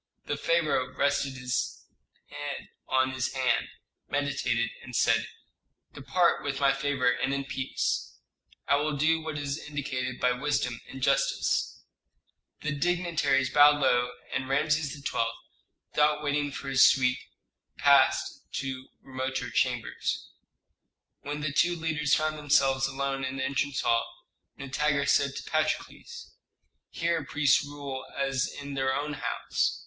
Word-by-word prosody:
The - - -2
pharaoh 155 -6 0
rested 140 -1 +1
his 125 -1 -3 0.4
head 145 -1 -6 0.2
on 130 0 +2
his 130 -1 -2
hand, 130 -2 +1 0.4
meditated, 135 -5 0
and 125 -1 -9
said, 115 -1 +3 0.7
"Depart 170 +5 +1
with 140 -1 -2
my 140 -1 +4
favor 135 -3 +1
and 130 +2 -1
in 140 0 -3
peace. 135 -1 -2 0.5
I 140 - +4
will 150 0 -1
do 160 +3 +2
what 155 -1 -5
is 145 +1 -3
indicated 130 -4 -4
by 125 - +3
wisdom 125 -2 -1
and 130 -1 -8
justice." 135 0 +1 0.8
The 155 - -2
dignitaries 150 -4 +1
bowed 145 0 +7
low, 125 -3 +3 0.2
and 135 0 -2
Rameses 150 +1 +1
XII., - - +1 0.7
without 150 0 +2
waiting 145 0 0
for 135 0 -6
his 135 -1 +5
suite, 125 -1 +4 0.6
passed - - +4
to 135 -1 -4 0.2
remoter 130 0 -4
chambers. - - -1 0.9
When 145 +1 -5
the 145 -1 -2
two 175 +4 +3
leaders 155 -3 +1
found 155 0 -1
themselves 135 -2 +3
alone 135 0 -2
in 130 0 -3
the 130 - -1
entrance 140 0 -1
hall, 115 0 +1 0.5
Nitager 140 +1 0
said 140 -1 +2
to - - -5
Patrokles, 470 0 -3 0.6
"Here 170 -2 -1
priests 145 +1 +3
rule 140 -2 -6
as 135 -1 0
in 140 0 -7
their 135 -1 0
own 150 +1 -2
house. - - -1
140 Hz, 135 wpm, -28 LUFS, 130-150 Hz, 0.9 s, bowed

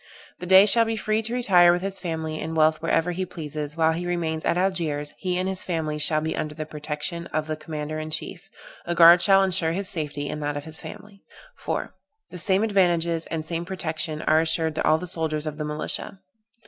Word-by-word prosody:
The 180 - -7
Dey 190 +2 +8
shall 230 +2 +5
be 225 0 -2
free 215 0 0
to 225 +1 -2
retire 180 -8 +5
with 175 +1 -1
his 195 0 -1
family 160 -3 -4
and 160 +1 -5
wealth 155 0 +3
wherever 165 +1 +1
he 185 +2 -3
pleases. 155 -3 -6
While 160 0 +3
he 175 +2 -4
remains 165 -3 -2
at - - +1
Algiers 165 -6 -1
he 180 -2 -2
and 185 +1 -1
his 190 +1 -2
family 160 -4 -3
shall 155 +1 +3
be 160 +1 -3
under 150 0 -4
the 155 0 -5
protection 150 +3 -5
of 155 0 -2
the 155 0 -3
commander 155 0 -6
in 155 0 -5
chief. 175 +5 -5 0.4
A 175 - -1
guard 170 +1 +8
shall 195 0 +5
insure 175 -4 +1
his 195 +2 -2
safety, 150 -4 -4
and 150 - -5
that 145 0 -2
of 145 - -5
his 160 0 -8
family. 200 -1 -11 0.4
"4. - - -4 0.4
The 180 - -7
same 190 +4 +2
advantages, 170 -5 +1
and 160 -1 -4
same 165 +1 -3
protection 160 -4 -4
are 155 +1 +3
assured 160 0 +1
to - - -2
all 155 - +4
the 180 - -6
soldiers 160 -3 -1
of 150 0 -5
the 150 - -2
militia. 150 +5 -3
165 Hz, 220 wpm, -24 LUFS, 155-180 Hz, 0.4 s, Dey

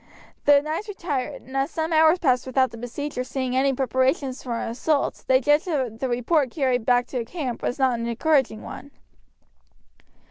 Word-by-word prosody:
The 285 0 +6
knights 315 +8 -3
retired; 320 -10 -4
and 265 - -11
as 270 +2 +1
some 320 0 -2
hours 315 +2 +5
passed 260 -7 +1
without 260 0 +2
the 230 - -9
besiegers 250 +2 -5
seeing 260 -2 -2
any 270 +1 +3
preparation 260 +1 0
for 250 -2 -5
an - - -3
assault 280 +5 -1
they 260 0 +5
judged 295 +4 +2
that 260 -9 -2
the 265 - -2
report 255 +4 +1
carried 255 -4 0
back 245 -1 +4
to 250 -3 -2
camp 255 -2 -5
was - - -2
not 260 -4 +2
an 230 - -3
encouraging 255 -2 +1
one. 280 - -9
265 Hz, 180 wpm, -24 LUFS, 245-295 Hz, -, The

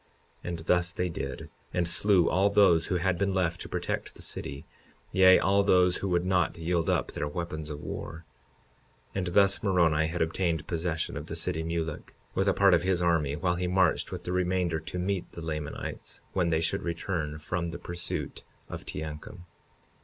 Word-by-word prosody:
52:25 - - -4
And 85 -1 -4
thus 90 0 +2
they 90 0 -1
did, 85 - -5 0.3
and 85 -1 +1
slew 90 +1 +4
all 95 +2 +3
those 100 -5 +4
who 90 - 0
had 90 0 0
been 100 -1 +1
left 90 -2 0
to - - -7
protect - - -3
the - - -7
city, 70 0 -5 0.5
yea, 95 0 +7
all 100 +1 +3
those 90 -2 +4
who 100 - -3
would 90 0 +1
not 90 -3 +1
yield 85 0 0
up - - +1
their 75 - -3
weapons 80 -1 -4
of 75 -1 -6
war. 80 +2 -6 0.9
52:26 - - -5
And 90 -2 -1
thus 100 -1 +5
Moroni 85 -6 +3
had 85 +1 0
obtained 80 -1 -1
possession 85 -1 -2
of - - -6
the - - -5
city 80 - -1
Mulek 80 -1 -4 0.2
with 95 - 0
a - - +3
part 100 -2 +5
of 85 - +4
his 95 0 +1
army, 80 -5 +2
while 90 +2 0
he 90 0 -1
marched 90 -1 +2
with - - -6
the 90 - -4
remainder 90 -2 0
to 80 +3 -7
meet 95 0 -2
the 85 - -7
Lamanites 75 -2 -5
when 90 -3 +1
they 80 -1 +2
should 80 - 0
return 85 -3 -3
from 85 +2 -3
the 85 - -5
pursuit 85 0 -5 0.3
of - - -7
Teancum. 80 +4 -7
85 Hz, 195 wpm, -28 LUFS, 80-95 Hz, 0.9 s, yea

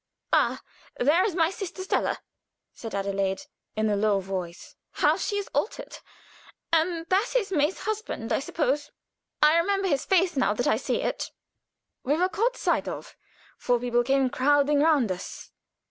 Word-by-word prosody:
"Ah! - - +2 0.3
there 305 +8 +4
is 390 -4 -1
my 330 -1 +3
sister 380 -1 -6
Stella," 380 - 0 0.6
said 225 -3 -7
Adelaide, 195 -1 -1 0.3
in 220 0 +1
a 210 - +2
low 205 -1 +2
voice. 185 -3 -6 0.2
"How - - +3
she 410 - -2
is 405 - -3
altered! 430 - -3 0.7
And 330 0 +2
that 400 +6 +1
is 415 -5 -2
May's 305 0 +1
husband, 435 - -3
I - - +2
suppose. 290 0 -1 0.5
I 305 +2 +6
remember 390 +2 +1
his 285 -6 +1
face 365 -2 +2
now 255 -6 +2
that 245 - -1
I - - +4
see - - -1
it." - - -2 0.7
We 275 - +1
had 310 - 0
been 365 +1 +3
caught 475 +6 0
sight - - 0
of. - - -7 0.4
Four 245 -1 +1
people 240 0 +1
came 270 0 +2
crowding 290 +2 +3
round 290 -8 +3
us. 180 - -7
290 Hz, 165 wpm, -26 LUFS, 235-370 Hz, 0.7 s, I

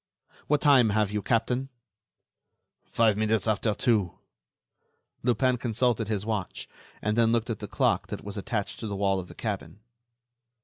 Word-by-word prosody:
What 150 0 +2
time 135 -6 +6
have 105 -1 +1
you, 105 0 -1
captain?" 125 +5 0 1.2
"Five 110 -3 +2
minutes 110 0 +1
after 110 0 +1
two." 105 -8 +1 1.0
Lupin 125 +1 +2
consulted 120 -1 0
his 105 -2 -2
watch, 105 -5 -3 0.4
then 115 +2 +3
looked 115 0 0
at 110 - -4
the - - -6
clock - - +1
that - - -6
was 100 0 -6
attached 105 0 -3
to 110 - -4
the 100 - -3
wall 95 -1 +1
of 90 - -7
the - - -13
cabin. 105 -1 -5
110 Hz, 150 wpm, -27 LUFS, 105-120 Hz, 1.2 s, time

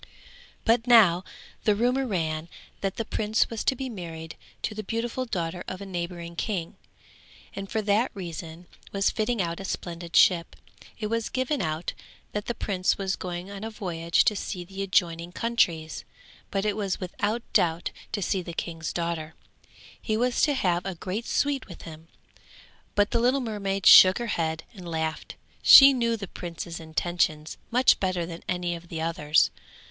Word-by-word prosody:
But 230 +1 +3
now 195 -7 +6 0.4
the 210 - +3
rumour 250 +4 +1
ran 160 -5 -2 0.3
that 195 -1 -2
the 230 - -3
prince 215 +1 0
was 225 - -3
to 265 - +3
be 265 +1 -4
married 165 -7 -7 0.3
to 215 - -1
the 215 - -4
beautiful 230 +4 -3
daughter 175 -5 -3
of 185 - -5
a 200 - -7
neighbouring 170 -2 -5
king, 175 -2 -3 0.8
and 195 0 -6
for 220 - -1
that 210 +4 +2
reason 170 -2 -7 0.3
was 200 0 +1
fitting 220 -2 0
out 170 0 -3
a - - -6
splendid 170 -2 -5
ship. 170 -3 +4 0.4
It 215 - -4
was 230 +1 -1
given 260 +2 -1
out 155 +1 -2 0.4
that 210 0 -4
the 240 - -2
prince 185 -4 0
was 190 -1 -1
going 180 +1 -6
on 200 +1 -7
a 225 - -3
voyage 170 -6 0
to 210 - +2
see 185 -2 -4
the 195 +2 -7
adjoining 175 -3 0
countries, 175 -9 0 0.5
but 195 +1 -1
it 210 -1 +1
was 200 -3 -2
without 205 +5 -2
doubt 170 0 +2 0.2
to 205 - -2
see 190 +1 0
the 170 -1 -7
king's 165 -2 -4
daughter; 170 -2 -3 0.7
he 215 -1 -1
was 245 +1 +1
to 295 -2 +3
have 180 -7 +1
a 190 -2 -4
great 190 +7 -4
suite 280 -2 0
with 175 - -11
him. 160 -1 -11 0.9
But 205 0 +3
the 235 - +2
little 250 +4 +3
mermaid 200 -5 -3
shook 185 0 +10
her 240 - -3
head 160 -1 -1
and 180 -5 -9
laughed; 160 -1 -3 0.3
she 275 0 +10
knew 235 -2 +1
the 200 -2 -6
prince's 170 -1 -6
intentions 160 -1 -1
much 250 +2 +4
better 185 -3 0
than 165 0 -8
any 180 -1 -1
of 170 0 -8
the 165 -1 -5
others. 160 -2 +2
185 Hz, 175 wpm, -26 LUFS, 170-220 Hz, 0.9 s, shook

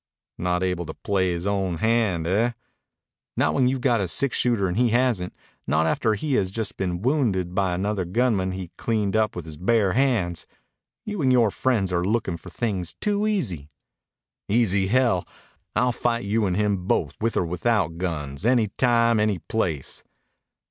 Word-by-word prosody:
"Not 90 0 0
able 90 -2 -1
to - - -7
play 95 -3 0
his 85 +1 -3
own 95 -4 0
hand, 110 -6 +1
eh?" 110 +7 +1 0.8
"Not - - +2
when 130 -2 +3
you've 130 0 0
got 120 -3 +2
a 95 - -1
six 130 - 0
shooter 115 -6 +1
and 90 - -2
he 120 +2 +3
hasn't. 120 -6 +1 0.4
Not 80 +1 +2
after 110 +6 +1
he 140 +7 -2
has 95 -7 +2
just 110 +1 -4
been 90 0 -3
wounded 110 - +1
by 95 -2 +1
another 100 +1 -1
gunman 95 -1 0
he 95 -2 -6
cleaned 110 -3 0
up 110 -1 +1
with 90 -3 -6
his 80 -2 -9
bare 100 +2 +2
hands. 115 -11 0 0.6
You 210 -4 -3
and 130 -2 +3
yore 120 -4 +4
friends 105 -8 0
are 85 0 +1
lookin' 100 -3 0
for 90 - -12
things 95 -3 -3
too 205 0 0
easy." 95 - -2 0.8
"Easy, 100 -3 +2
hell! 120 -5 +2 0.5
I'll 125 0 +3
fight 120 0 -1
you 105 +1 +1
and 90 0 -1
him 100 -3 0
both, - - +1
with 115 +1 0
or - - +2
without 85 -1 0
guns. 75 -5 -4
Any 120 -2 +3
time. 115 -2 +3
Any 105 -2 +1
place." 85 -7 -3
100 Hz, 175 wpm, -24 LUFS, 90-120 Hz, 0.8 s, yore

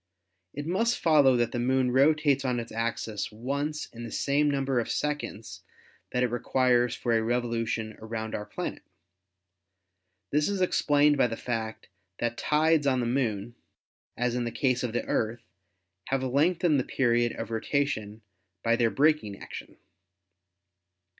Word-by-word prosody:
It 145 +1 -4
must 225 +8 +1
follow 145 -6 +5
that 120 -1 +1
the 120 - -2
Moon 130 +1 +2
rotates 140 +1 +3
on 125 -2 0
its 115 - -7
axis 115 -2 -3
once 140 +7 -3
in 120 0 -8
the 115 - -6
same 145 +1 +1
number 135 -2 0
of 115 - -3
seconds 110 -10 -3 0.5
that 125 - +1
it 125 - 0
requires 120 0 +2
for 120 -2 0
a 115 - +3
revolution 115 -2 -1
around 110 0 -5
our 105 - -4
planet. - - -5 1.5
This 150 +5 +2
is 200 -1 -1
explained 145 -5 +3
by 130 - +4
the 115 -1 -5
fact 110 -2 -4 0.3
that 120 0 -1
tides 155 +1 +2
on 130 -2 +2
the 120 - 0
Moon, 120 -3 -1 0.6
as 125 -1 0
in 125 0 -1
the 120 - -3
case 125 -1 +1
of 120 -3 -3
the 120 - -1
Earth, 115 +1 -1 0.6
have 135 -1 0
lengthened 155 +4 +2
the - - 0
period 120 -2 +1
of - - -6
rota 140 +6 +1
tion 110 -5 -5 0.4
by 115 0 +3
their 120 -1 +2
braking 140 -8 +2
action. - - -9
125 Hz, 155 wpm, -28 LUFS, 115-145 Hz, 1.5 s, follow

